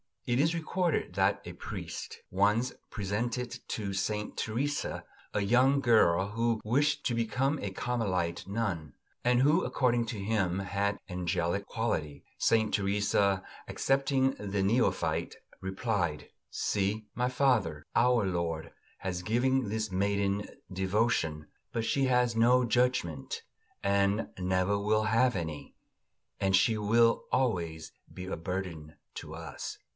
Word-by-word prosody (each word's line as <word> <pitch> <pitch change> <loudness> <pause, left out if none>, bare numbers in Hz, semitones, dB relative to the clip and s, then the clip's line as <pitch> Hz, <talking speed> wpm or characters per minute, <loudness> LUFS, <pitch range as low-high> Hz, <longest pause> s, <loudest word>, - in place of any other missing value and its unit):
It 120 +1 +1
is 160 +4 +3
recorded 170 - -1
that 95 +1 +2
a - - -7
priest - - -7
once 105 +6 +2 0.2
presented 120 +5 -2
to 100 -3 -3
Saint 105 +2 -2
Teresa 140 +7 -2 0.3
a - - +1
young 125 +7 +4
girl 100 -6 +4
who 115 +1 0
wished 145 +6 +1
to 120 - 0
become 130 +5 0
a 100 - -3
Carmelite 95 -6 -2
nun, 100 -8 -2 0.3
and 125 0 +4
who, 150 +4 +4
according 120 -2 +1
to 110 - -4
him, 100 -3 0
had 100 +1 -1
angelic 90 +1 -1
qualities. 75 -11 -2 0.2
Saint 110 -1 +3
Teresa, 100 -1 +2 0.2
accepting 135 -1 +2
the 100 -1 -1
neophyte, 115 +6 +1 0.2
replied: 95 -6 -2 0.2
"See, 105 +2 -1
my 125 +1 0
father, 125 - +1
our 120 -2 +4
Lord 85 -3 -2 0.3
has 90 -2 -3
given 125 +2 +1
this 110 -1 -2
maiden 100 +1 0 0.2
devotion, 95 -5 0 0.3
but 115 -1 -1
she 135 +3 +2
has 125 -2 +2
no 125 +3 +5
judgment, 120 - 0 0.4
and 100 +2 +2
never 95 +2 +1
will 110 +1 +2
have 115 +3 +3
any; 80 -4 -5 0.6
and 95 -1 +3
she 110 +4 +3
will 115 +2 +3
always 85 -11 0 0.2
be 90 - -7
a - - -3
burden 85 -3 -5 0.2
to 80 - -7
us." 80 -3 -6
105 Hz, 130 wpm, -30 LUFS, 95-120 Hz, 0.6 s, no